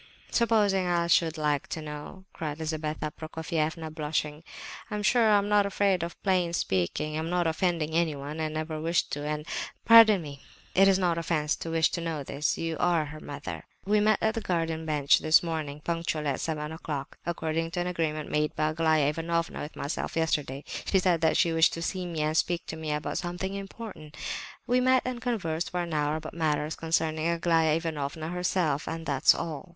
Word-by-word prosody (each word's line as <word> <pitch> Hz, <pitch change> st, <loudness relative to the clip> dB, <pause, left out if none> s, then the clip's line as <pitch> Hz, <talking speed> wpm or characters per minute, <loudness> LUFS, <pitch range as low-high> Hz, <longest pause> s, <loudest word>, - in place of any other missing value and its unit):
Supposing 205 Hz, -5 st, +3 dB
I 170 Hz, -1 st, +2 dB
should 170 Hz, -1 st, +3 dB
like 150 Hz, -2 st, 0 dB
to -, -, -4 dB
know?" 150 Hz, +5 st, -8 dB
cried 150 Hz, -2 st, -4 dB
Lizabetha 155 Hz, -1 st, -3 dB
Prokofievna, 160 Hz, 0 st, -3 dB
blushing. 150 Hz, -1 st, -2 dB, 0.5 s
"I'm 210 Hz, -1 st, -3 dB
sure 225 Hz, +2 st, +4 dB
I 210 Hz, -, +6 dB
am 200 Hz, 0 st, 0 dB
not 205 Hz, -1 st, +4 dB
afraid 195 Hz, -2 st, +1 dB
of 170 Hz, 0 st, -5 dB
plain 180 Hz, -3 st, +2 dB
speaking. 95 Hz, -, -1 dB
I'm 160 Hz, +1 st, -2 dB
not 175 Hz, 0 st, +1 dB
offending 165 Hz, -1 st, 0 dB
anyone, 155 Hz, -2 st, -1 dB
and 155 Hz, 0 st, -2 dB
I -, -, 0 dB
never 155 Hz, 0 st, -4 dB
wish 165 Hz, +1 st, +2 dB
to, 145 Hz, -, -4 dB
and—" 150 Hz, 0 st, -3 dB, 0.4 s
"Pardon 220 Hz, -5 st, +8 dB
me, 140 Hz, -2 st, -9 dB, 0.3 s
it 195 Hz, +1 st, +6 dB
is 195 Hz, -1 st, +5 dB
no 180 Hz, -2 st, +2 dB
offence 165 Hz, -2 st, 0 dB
to 165 Hz, -, -6 dB
wish 165 Hz, -1 st, +2 dB
to 170 Hz, -, -2 dB
know 160 Hz, -3 st, -3 dB
this; 140 Hz, +2 st, -1 dB
you 165 Hz, -1 st, -2 dB
are 170 Hz, -3 st, +2 dB
her 150 Hz, +1 st, -9 dB
mother. 145 Hz, -1 st, -7 dB, 0.2 s
We 210 Hz, +2 st, +3 dB
met 215 Hz, 0 st, +4 dB
at 220 Hz, -, +3 dB
the 225 Hz, -, -3 dB
green 165 Hz, -4 st, -1 dB
bench 150 Hz, -2 st, +4 dB
this 155 Hz, +2 st, +5 dB
morning, 155 Hz, -3 st, -4 dB
punctually 165 Hz, -2 st, -2 dB
at 135 Hz, -, -1 dB
seven 150 Hz, -1 st, -3 dB
o'clock,—according 160 Hz, +1 st, -3 dB
to 175 Hz, +1 st, -2 dB
an -, -, -2 dB
agreement 160 Hz, -4 st, -2 dB
made 150 Hz, 0 st, 0 dB
by 155 Hz, 0 st, +1 dB
Aglaya 155 Hz, -2 st, +2 dB
Ivanovna 165 Hz, +2 st, -2 dB
with 150 Hz, -, -7 dB
myself 145 Hz, -, -3 dB
yesterday. 150 Hz, -4 st, 0 dB, 0.2 s
She 195 Hz, -, +2 dB
said 180 Hz, -3 st, +2 dB
that 160 Hz, -1 st, +3 dB
she 170 Hz, -, +3 dB
wished 160 Hz, 0 st, +4 dB
to 165 Hz, -, -4 dB
see 185 Hz, 0 st, -2 dB
me 165 Hz, -3 st, -3 dB
and 155 Hz, +1 st, 0 dB
speak 175 Hz, +1 st, +1 dB
to -, -, -6 dB
me 160 Hz, -1 st, -4 dB
about 150 Hz, 0 st, -2 dB
something 180 Hz, +2 st, -3 dB
important. 195 Hz, -6 st, -8 dB, 0.5 s
We 250 Hz, +1 st, +3 dB
met 255 Hz, 0 st, +4 dB
and 250 Hz, -1 st, -3 dB
conversed 175 Hz, -10 st, -1 dB
for 180 Hz, 0 st, -1 dB
an 170 Hz, -2 st, -5 dB
hour 150 Hz, 0 st, +1 dB
about 155 Hz, 0 st, -6 dB
matters 155 Hz, -1 st, 0 dB
concerning 160 Hz, -1 st, 0 dB
Aglaya 165 Hz, -2 st, +2 dB
Ivanovna 160 Hz, -1 st, -3 dB
herself, 175 Hz, -4 st, 0 dB
and 165 Hz, 0 st, -4 dB
that's 140 Hz, -3 st, +4 dB
all." 160 Hz, +1 st, -5 dB
160 Hz, 195 wpm, -28 LUFS, 155-175 Hz, 0.5 s, Pardon